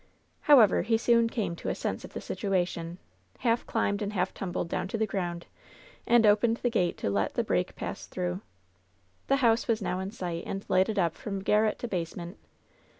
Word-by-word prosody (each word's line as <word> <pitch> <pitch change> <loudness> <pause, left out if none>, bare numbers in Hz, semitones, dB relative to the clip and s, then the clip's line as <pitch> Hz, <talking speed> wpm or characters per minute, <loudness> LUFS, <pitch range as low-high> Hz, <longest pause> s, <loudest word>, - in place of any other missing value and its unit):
However, 250 -10 +6
he 225 0 +2
soon 230 0 +3
came 200 -8 -2
to - - -4
a - - -1
sense - - -3
of - - -10
the - - -5
situation, 175 -3 -2 0.4
half 235 -1 +1
climbed 205 -2 0
and 205 0 -2
half 185 -1 0
tumbled 180 -2 -3
down 170 - -2
to 215 - -3
the 220 - +1
ground 175 -4 -3 0.6
and 235 -1 +5
opened 215 +2 +4
the 245 - -1
gate 180 -7 +1
to - - -2
let 100 0 0
the - - +1
break - - -1
pass - - -6
through. 90 +1 -3 0.9
The 275 - +4
house 230 +1 +3
was 225 -2 +2
now 185 -3 -2
in 190 +1 -3
sight 175 -6 -4
and 195 +1 -4
lighted 190 +4 +2
up 170 -4 +2
from 195 -2 -5
gar 210 +2 +4
ret 215 -1 +1
to 240 - -4
basement. 175 -1 -5
200 Hz, 200 wpm, -29 LUFS, 175-225 Hz, 0.9 s, However